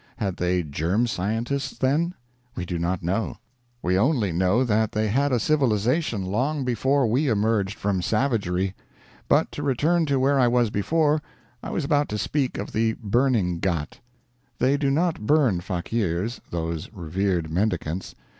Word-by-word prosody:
Had 95 -4 -2
they 90 0 +1
germ 85 +10 0
scientists 115 +6 -2
then? 155 +7 +1 0.4
We 90 - -4
do 85 -1 -3
not 85 +1 -1
know. 95 +6 -1 0.5
We 90 +2 +2
only 120 - +2
know 95 +8 +2
that 110 -2 +1
they 110 0 0
had 140 +6 +1
a 125 - +2
civilization 120 - +1
long 130 +9 -1
before 130 +3 +2
we 125 +7 +1
emerged 105 -3 +1
from 100 -2 0
savagery. 95 -4 0 0.6
But - - +3
to - - -6
return 155 +5 +1
to 140 -2 +1
where 135 +1 +3
I 125 - +5
was 120 -2 +2
before; 150 +8 +1 0.4
I - - -6
was 160 - -2
about 145 0 +1
to 105 - -2
speak 135 +3 -1
of 100 - -5
the 110 0 +1
burning 110 -6 +1
ghat. 85 -5 -2 0.6
They 135 +2 +3
do 140 -1 +1
not 155 -6 0
burn 140 - +3
fakeers 95 +3 -2
those 85 -1 -4
revered 90 -3 -2
mendicants. 90 -2 -2
110 Hz, 155 wpm, -24 LUFS, 95-135 Hz, 0.6 s, I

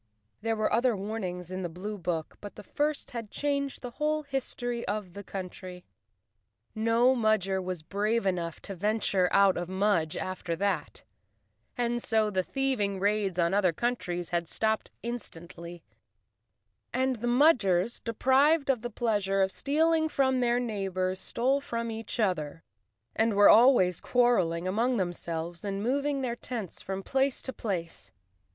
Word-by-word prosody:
There 225 +1 0
were 215 0 0
other 240 -2 +2
warnings 185 -4 -4
in 185 0 -3
the 175 - -3
blue 200 +5 -6
book, 165 -3 -3
but 205 - -9
the - - -10
first 295 +8 -2
had 230 -3 -6
changed 280 +1 -2
the 245 - -5
whole 305 +3 -1
history 245 -4 -3
of 200 -3 -3
the 200 - -8
country. 185 -2 -7 0.9
No 230 +4 +3
Mudger 215 -5 +1
was 180 -3 -4
brave 210 +6 0
enough 175 -3 -1
to 200 - -6
venture 200 -1 +1
out 195 -1 +5
of 175 0 -4
Mudge 190 -5 +1
after 185 -2 -3
that, 185 -4 -2 1.0
so 220 -2 +1
the 190 -2 +1
thieving 210 -4 -1
raids 200 -2 0
on 170 0 +2
other 195 -3 +3
countries 175 -4 -2
had 170 -1 0
stopped 220 +4 -1
instantly, 175 -7 -7 1.1
and 260 -1 0
the 240 +2 -3
Mudgers, 240 - +3
deprived 275 +6 +3
of 250 -4 -2
the 240 - -4
pleasure 205 -5 +1
of 190 - 0
stealing 315 +5 +1
from 265 -3 +2
their 240 0 +2
neighbors, 190 -5 -2
stole 265 +7 0
from 230 -4 -3
each 225 +1 -6
other, 165 -7 -1 0.5
and 220 -1 +2
were 205 0 +7
always 220 -7 +6
quarreling 185 -9 +2
among 235 +6 +1
them¬ 180 -3 0
selves 170 +1 -5
and 200 0 -3
moving 280 +3 0
their 240 -2 -2
tents 230 -7 -6
from 195 0 -5
place 270 +3 0
to 260 - -4
place. 180 -8 -4
210 Hz, 150 wpm, -29 LUFS, 185-245 Hz, 1.1 s, were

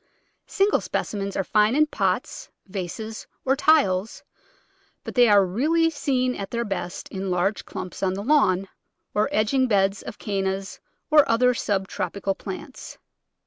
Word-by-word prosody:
Single 395 +1 +2
specimens 200 -1 -3
are 195 - +1
fine 210 +5 +2
in 305 +1 +5
pots, - - -2 0.2
vases, 205 +3 -6 0.2
or 265 +1 +3
tiles, 230 -10 +2 0.8
but - - -7
they 245 -1 +5
are 200 -2 +6
really 315 - +1
seen 265 -4 0
at 195 -4 -6
their 235 0 -2
best 180 -3 -4
in 190 0 -4
large 180 +3 0
clumps 185 - -7
on 190 -1 0
the 200 - -5
lawn, 195 -9 +3 0.5
or 210 +1 +1
edging 255 +5 +2
beds 195 -2 +2
of - - -8
Cannas 195 -1 -3 0.3
or 300 -1 +8
other 250 +2 +4
sub 195 -4 -1
tropical 195 +1 -3
plants. 200 +8 -8
210 Hz, 145 wpm, -24 LUFS, 195-255 Hz, 0.8 s, or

